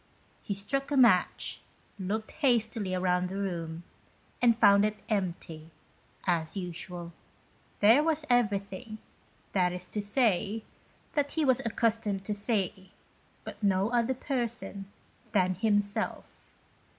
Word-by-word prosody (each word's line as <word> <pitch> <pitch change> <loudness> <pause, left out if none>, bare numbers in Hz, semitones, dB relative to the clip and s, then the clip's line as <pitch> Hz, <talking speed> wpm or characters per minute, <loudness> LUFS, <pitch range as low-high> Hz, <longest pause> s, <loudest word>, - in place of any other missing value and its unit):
He 200 - -3
struck 275 +8 -2
a 290 - 0
match, 225 -9 +3 0.4
looked 215 +4 -3
hastily 225 -8 +1
round 180 0 +1
the 195 - -5
room, 170 -4 -4 0.6
and 235 -2 +5
found 200 -2 +6
it 215 0 0
empty, 170 -6 -3 0.6
as 170 -1 0
usual. 175 -1 -5 0.7
There 225 +7 +7
was 315 -1 0
everything, 215 -2 0 0.5
that 180 -2 +2
is 180 0 -6
to 210 - -2
say, 215 -1 +1 0.5
that 285 -1 0
he 315 -2 +1
was 260 -2 +4
accustomed 225 -3 0
to 210 - -1
see, 200 -3 -1 0.5
but - - -9
no 200 +1 +2
other 240 +2 +1
person 230 -7 -4 0.4
than 185 -2 +3
himself. 205 +1 -1
205 Hz, 120 wpm, -29 LUFS, 185-235 Hz, 0.7 s, There